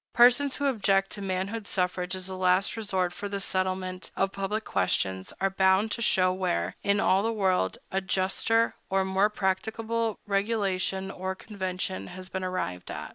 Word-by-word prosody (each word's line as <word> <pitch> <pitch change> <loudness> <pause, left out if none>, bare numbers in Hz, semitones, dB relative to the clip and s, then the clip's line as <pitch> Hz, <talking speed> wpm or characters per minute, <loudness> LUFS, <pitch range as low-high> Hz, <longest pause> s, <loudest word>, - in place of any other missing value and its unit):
Persons 250 +3 +6
who 285 - -2
object 195 -7 +2
to 205 - -6
manhood 195 +3 -3
suffrage 180 0 0
as 185 -1 -4
the 190 0 -5
last 185 +1 +2
resort 190 -5 -1
for 205 +1 -5
the 200 0 -3
settlement 185 -1 -1
of 195 0 +1
public 200 +3 -2
questions 95 0 0
are 195 0 +1
bound 190 +3 +3
to 235 - -2
show 185 -4 +3
where, 95 - -1
in 200 0 +2
all 190 0 +4
the 225 +2 0
world, 190 - +1
a 195 - 0
juster 195 +5 +1 0.2
or 190 0 +2
more 190 +2 +3
practicable 220 +3 -1
regulation 195 -2 0
or 190 0 -4
convention 190 -2 -4
has 185 +1 -9
been 190 -1 -4
arrived 90 - -3
at. - - -5
190 Hz, 170 wpm, -28 LUFS, 185-205 Hz, 0.2 s, Persons